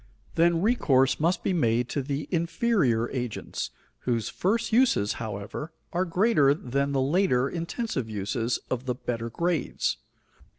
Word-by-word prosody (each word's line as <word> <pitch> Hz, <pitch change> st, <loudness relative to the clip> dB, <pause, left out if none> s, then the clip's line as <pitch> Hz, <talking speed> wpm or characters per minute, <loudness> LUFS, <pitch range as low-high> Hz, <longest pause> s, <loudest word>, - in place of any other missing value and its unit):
Then 170 Hz, +1 st, +3 dB
recourse 135 Hz, -, +3 dB
must 170 Hz, +4 st, +1 dB
be -, -, +1 dB
made 120 Hz, -7 st, +2 dB
to 145 Hz, -, -1 dB
the 140 Hz, +2 st, -3 dB
inferior 165 Hz, -, +1 dB
agents, 125 Hz, -4 st, -4 dB, 0.3 s
whose 115 Hz, -4 st, -1 dB
first 220 Hz, +4 st, 0 dB
uses, 230 Hz, -, +3 dB
however, 110 Hz, +9 st, -5 dB, 0.2 s
are 180 Hz, +2 st, +1 dB
greater 170 Hz, -6 st, +3 dB
than 140 Hz, 0 st, -1 dB
the 135 Hz, -1 st, +1 dB
later, 140 Hz, -4 st, +2 dB
intensive 170 Hz, -, -3 dB
uses, 110 Hz, +3 st, -1 dB
of 130 Hz, +1 st, -2 dB
the 125 Hz, -, 0 dB
better 115 Hz, -2 st, -3 dB
grades. 170 Hz, +4 st, -1 dB
140 Hz, 135 wpm, -27 LUFS, 120-175 Hz, 0.3 s, Then